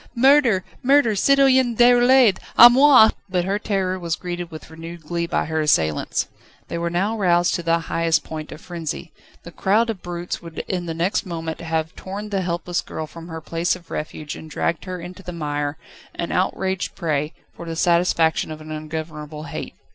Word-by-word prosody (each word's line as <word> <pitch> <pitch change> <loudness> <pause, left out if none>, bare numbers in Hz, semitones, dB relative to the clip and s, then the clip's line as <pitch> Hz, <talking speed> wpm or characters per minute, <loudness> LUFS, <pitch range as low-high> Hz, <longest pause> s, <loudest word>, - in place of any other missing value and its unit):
Murder! 250 -6 +4 0.2
Murder! 270 -4 +4
Citoyen 260 +1 +4
Déroulède, 245 -2 +5 0.2
à 240 +1 +11
moi!" 260 -3 +7 0.2
But 180 -1 0
her 200 +2 0
terror 190 -3 -1
was 170 -2 -2
greeted 175 -1 -5
with 160 -1 -11
renewed 165 +1 -9
glee 170 +2 -2
by - - 0
her 160 0 -1
assailants. 80 - +1 0.4
They 170 - -3
were 170 0 -1
now 195 +6 0
roused 175 -4 +2
to 175 - -1
the 165 0 +2
highest 165 0 0
point 155 -1 -7
of 155 - -10
frenzy: 170 -1 -6 0.3
the 170 - -10
crowd 220 +6 +2
of 200 - -9
brutes 175 0 -5
would 165 -1 -7
in 180 -2 -3
the 165 - -3
next 175 +4 0
moment 165 -2 -5
have 160 0 -2
torn 200 +3 -7
the 195 -1 0
helpless 175 0 -2
girl 160 - -6
from 165 +2 -11
her 160 -1 -7
place 165 +3 -1
of 175 -2 -15
refuge 150 0 -5
and 160 - -10
dragged 165 +3 -2
her 185 -1 -5
into 180 +3 -9
the 180 -1 -7
mire, 145 -2 -3 0.4
an 170 - -4
outraged 190 0 -1
prey, 155 -3 -1 0.2
for 170 - -9
the 165 - -4
satisfaction 170 -2 +2
of 155 -1 -7
an 155 0 -10
ungovernable 155 -1 -6
hate. 150 - -7
175 Hz, 185 wpm, -22 LUFS, 160-195 Hz, 0.4 s, à